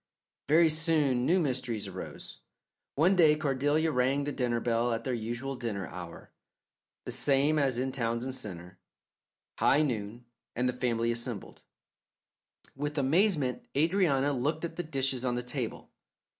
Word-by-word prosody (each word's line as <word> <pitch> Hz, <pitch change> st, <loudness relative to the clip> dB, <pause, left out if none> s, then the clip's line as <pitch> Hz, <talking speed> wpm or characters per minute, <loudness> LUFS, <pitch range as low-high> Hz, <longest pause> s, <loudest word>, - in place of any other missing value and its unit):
Very 160 Hz, +3 st, +5 dB
soon 155 Hz, -6 st, +2 dB
new 180 Hz, +3 st, +4 dB
mysteries 125 Hz, -, -2 dB
arose. 95 Hz, -1 st, -8 dB, 0.6 s
One 175 Hz, +7 st, +4 dB
day 160 Hz, -4 st, +6 dB
Cordelia 150 Hz, +2 st, +1 dB
rang 135 Hz, +2 st, +1 dB
the 145 Hz, -, -2 dB
dinner 120 Hz, -4 st, 0 dB
bell 120 Hz, +1 st, 0 dB
at 115 Hz, 0 st, -3 dB
their 130 Hz, -, -2 dB
usual 120 Hz, +4 st, -3 dB
dinner 110 Hz, -6 st, -4 dB
hour, 85 Hz, -1 st, -9 dB, 0.7 s
the -, -, -4 dB
same 145 Hz, +2 st, +2 dB
as 135 Hz, -4 st, +1 dB
in 130 Hz, +1 st, -1 dB
Townsend 120 Hz, +1 st, -2 dB
Centre, 90 Hz, -6 st, -8 dB, 0.8 s
high 150 Hz, +3 st, +4 dB
noon, 120 Hz, -3 st, -3 dB, 0.3 s
and 125 Hz, +1 st, +1 dB
the 125 Hz, -, 0 dB
family 120 Hz, -2 st, 0 dB
assembled. 120 Hz, -3 st, -5 dB, 1.1 s
With 145 Hz, +2 st, -4 dB
amazement 145 Hz, -1 st, +1 dB
Adrianna 145 Hz, -3 st, +2 dB
looked 150 Hz, +6 st, -1 dB
at 165 Hz, -, -6 dB
the 175 Hz, -, -2 dB
dishes 135 Hz, -5 st, -1 dB
on 125 Hz, -1 st, 0 dB
the 125 Hz, -, -2 dB
table. 125 Hz, -1 st, -4 dB
130 Hz, 145 wpm, -30 LUFS, 120-150 Hz, 1.1 s, day